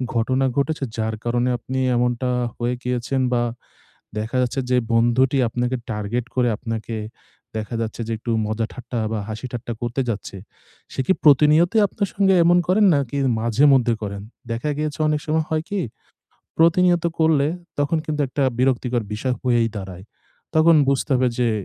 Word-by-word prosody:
ঘটনা 130 Hz, +3 st, +1 dB
ঘটেছে 145 Hz, +1 st, 0 dB
যার 110 Hz, 0 st, -1 dB
কারণে 120 Hz, +1 st, 0 dB
আপনি 130 Hz, +2 st, -4 dB, 0.2 s
এমনটা 125 Hz, +1 st, 0 dB, 0.3 s
হয়ে 120 Hz, +1 st, -1 dB
গিয়েছেন 125 Hz, +2 st, -1 dB
বা, 120 Hz, -1 st, +2 dB, 0.8 s
দেখা 110 Hz, +3 st, -4 dB
যাচ্ছে 125 Hz, +2 st, -1 dB
যে 125 Hz, -, +4 dB, 0.2 s
বন্ধুটি 120 Hz, +4 st, +3 dB
আপনাকে 125 Hz, +2 st, -1 dB
টার্গেট 110 Hz, +3 st, -2 dB
করে 125 Hz, -2 st, +2 dB
আপনাকে 115 Hz, -1 st, -5 dB, 0.6 s
দেখা 110 Hz, +2 st, -4 dB
যাচ্ছে 115 Hz, +1 st, -4 dB
যে -, -, -3 dB
একটু 115 Hz, -, -3 dB
মজা-ঠাট্টা 115 Hz, +3 st, -4 dB
বা, 110 Hz, -, -1 dB
হাসি-ঠাট্টা 120 Hz, +2 st, -5 dB
করতে 120 Hz, +2 st, -1 dB
যাচ্ছে। 100 Hz, -2 st, -4 dB, 0.6 s
সে -, -, -7 dB
কি 190 Hz, -, +5 dB
প্রতিনিয়তই 155 Hz, -, +5 dB
আপনার 200 Hz, +1 st, -2 dB
সঙ্গে 195 Hz, -1 st, +4 dB
এমন 175 Hz, +1 st, +5 dB
করেন 200 Hz, +4 st, +4 dB
নাকি 140 Hz, -1 st, -1 dB, 0.2 s
মাঝেমধ্যে 120 Hz, +1 st, +4 dB
করেন? 100 Hz, -1 st, -5 dB, 0.3 s
দেখা 115 Hz, +6 st, -2 dB
গিয়েছে 150 Hz, 0 st, -3 dB
অনেক 150 Hz, 0 st, +1 dB
সময় 155 Hz, 0 st, 0 dB
হয় 155 Hz, 0 st, 0 dB
কি 205 Hz, -, 0 dB, 0.8 s
প্রতিনিয়ত 170 Hz, +1 st, +4 dB
করলে 155 Hz, -3 st, +3 dB, 0.3 s
তখন 145 Hz, +3 st, +1 dB
কিন্তু 150 Hz, -1 st, -2 dB
একটা 140 Hz, +2 st, -1 dB, 0.2 s
বিরক্তিকর 125 Hz, -2 st, +1 dB
বিষয় 125 Hz, +4 st, -1 dB
হয়েই 120 Hz, -3 st, +2 dB
দাঁড়ায়। 95 Hz, -2 st, -8 dB, 0.5 s
তখন 160 Hz, +1 st, +6 dB
বুঝতে 140 Hz, +1 st, +1 dB
হবে 130 Hz, 0 st, +2 dB
যে 120 Hz, -1 st, +3 dB
125 Hz, 150 wpm, -22 LUFS, 115-150 Hz, 0.8 s, তখন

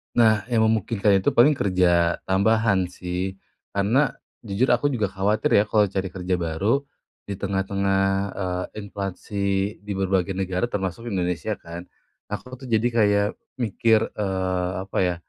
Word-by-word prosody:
Nah, 110 Hz, -3 st, +4 dB
yang 115 Hz, -2 st, +1 dB
memungkinkan 105 Hz, -2 st, +2 dB
itu -, -, +3 dB
paling 140 Hz, +4 st, +5 dB
kerja, 85 Hz, -3 st, +2 dB
tambahan 100 Hz, 0 st, +3 dB
sih. 90 Hz, +1 st, -4 dB, 0.4 s
Karena, 115 Hz, +8 st, +2 dB, 0.3 s
jujur 110 Hz, +5 st, 0 dB
aku 120 Hz, +3 st, +2 dB
juga 105 Hz, -5 st, 0 dB
khawatir 100 Hz, +3 st, +1 dB
ya, 100 Hz, -, +4 dB
kalau 105 Hz, -1 st, +2 dB
cari 95 Hz, 0 st, -2 dB
kerja 90 Hz, -1 st, -1 dB
baru, 95 Hz, -, 0 dB, 0.4 s
di 100 Hz, -, -4 dB
tengah-tengah, 95 Hz, 0 st, 0 dB, 0.3 s
eee, 90 Hz, -1 st, -2 dB
inflasi, 100 Hz, 0 st, -3 dB
di 105 Hz, -, -7 dB
berbagai 95 Hz, -1 st, 0 dB
negara, 95 Hz, +4 st, -1 dB
termasuk 105 Hz, +3 st, -3 dB
Indonesia 90 Hz, -5 st, -2 dB
kan. 85 Hz, +2 st, -9 dB, 0.4 s
Aku 125 Hz, +5 st, -6 dB
tuh 130 Hz, -, -8 dB
jadi 115 Hz, +1 st, +2 dB
kayak 105 Hz, -2 st, +3 dB, 0.3 s
mikir, 115 Hz, -1 st, +2 dB
eee, 95 Hz, -3 st, -1 dB
apa 95 Hz, -, -6 dB
ya, 90 Hz, -1 st, +1 dB
100 Hz, 140 wpm, -24 LUFS, 95-110 Hz, 0.4 s, paling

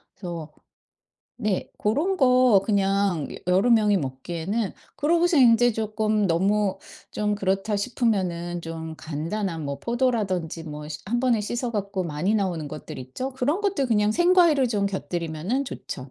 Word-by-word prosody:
그래서 170 Hz, -5 st, -7 dB, 0.9 s
네. 210 Hz, -5 st, -1 dB
고런 300 Hz, -, 0 dB
거 250 Hz, -, +5 dB
그냥 195 Hz, -6 st, +1 dB, 0.2 s
여러 185 Hz, +6 st, +3 dB
명이 210 Hz, -4 st, +4 dB
먹기에는 170 Hz, -, -3 dB, 0.2 s
그러고서 335 Hz, +3 st, +2 dB
인제 245 Hz, -2 st, +6 dB
쪼끔 215 Hz, -1 st, 0 dB
'너무 195 Hz, +3 st, +1 dB, 0.3 s
좀 210 Hz, 0 st, -1 dB
그렇다.' 195 Hz, +1 st, 0 dB
싶으면은 185 Hz, -7 st, -1 dB
좀 160 Hz, -1 st, -6 dB
간단한 165 Hz, +3 st, -3 dB
뭐 140 Hz, 0 st, -4 dB
포도라든지 210 Hz, -, -1 dB
뭐 150 Hz, -1 st, -7 dB
씨 145 Hz, -3 st, -6 dB
1 240 Hz, +5 st, -1 dB
번에 245 Hz, -4 st, +2 dB
씻어 240 Hz, +3 st, -2 dB
갖고 200 Hz, -2 st, -2 dB
많이 170 Hz, +6 st, -1 dB
나오는 180 Hz, -7 st, -1 dB
것들 150 Hz, -2 st, -8 dB
있죠. 130 Hz, -, -5 dB
그런 285 Hz, +9 st, 0 dB
것들 395 Hz, -10 st, 0 dB
그냥 210 Hz, -2 st, +2 dB
생과일을 345 Hz, -6 st, +4 dB
좀 205 Hz, -3 st, 0 dB
곁들이면은 180 Hz, -, -2 dB
좋죠. 130 Hz, -, -7 dB
205 Hz, 300 characters per minute, -25 LUFS, 170-240 Hz, 0.9 s, 인제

